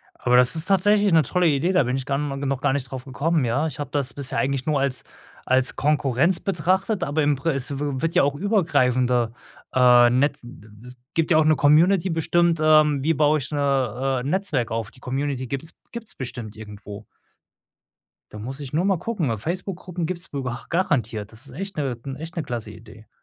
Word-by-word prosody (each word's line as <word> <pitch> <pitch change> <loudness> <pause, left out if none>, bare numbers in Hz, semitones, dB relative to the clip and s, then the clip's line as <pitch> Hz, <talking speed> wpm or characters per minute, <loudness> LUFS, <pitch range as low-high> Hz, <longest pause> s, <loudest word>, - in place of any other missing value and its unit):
Aber 125 0 +2
das 125 +4 +6
ist 160 +1 +4
tatsächlich 200 +1 +3
'ne 160 -2 +5
tolle 180 +6 +1
Idee, 150 +4 +1
da 185 -4 +3
bin 125 +1 -1
ich 135 -1 -4
dann 140 +1 -1
no 135 - -4
noch 135 -1 -2
gar 135 - +2
nicht 140 -3 -3
drauf 130 -1 -7
gekommen, 145 +2 0
ja? 135 +7 0
Ich 145 -3 -8
habe 145 -2 -4
das 140 -4 -1
bisher 140 -1 -5
eigentlich 135 -1 -1
nur 150 -3 +1
als 135 -1 -1 0.4
als 130 0 +1
Konkurrenz 150 +3 +1
betrachtet, 190 +2 0
aber 150 +2 0
im 145 -1 +2
pres 135 -2 -2
äh, - - -2
es - - -6 0.2
wird 165 +1 -1
ja - - +5
auch 140 0 0
übergreifender, 130 - +1 0.4
äh, 125 -1 +6
Netz 140 +3 +1
n 120 +3 -12
d 110 - -16 0.2
s 125 0 -11 0.2
gibt 165 0 0
ja 155 - +6
auch 155 - +4
'ne 155 0 +4
Community 165 +6 +4
bestimmt, 170 0 +1
ähm, 155 -2 +4
wie 160 +3 +2
baue 150 0 +3
ich 140 - -7
'ne, 135 -3 0
äh, - - -4
Netzwerk 155 - -1
auf, 115 -1 -3
die 130 - -19
Community 130 0 -3
gibt's 140 +6 -4 0.2
gibt's 235 -2 -6
bestimmt 120 -4 -7
irgendwo. 105 -1 -10 1.3
Da 105 - -9
muss 130 +6 -6
ich 140 -1 -7
nur 165 - +1
mal 195 -3 +1
gucken, 185 - -2
weil 115 - -1
Facebook-Gruppen 180 - -4
gibt 175 +1 -4
es 175 - -7
w 140 - -2
b 125 - -3 0.2
garantiert. 120 - -1
Das 115 +5 -9
ist 130 - -12
echt 195 +5 -6
'ne 135 -5 -2 0.2
echt 165 +3 -8
'ne 165 - -2
klasse 115 -5 -5
Idee. 110 0 -15
140 Hz, 215 wpm, -23 LUFS, 125-165 Hz, 1.3 s, das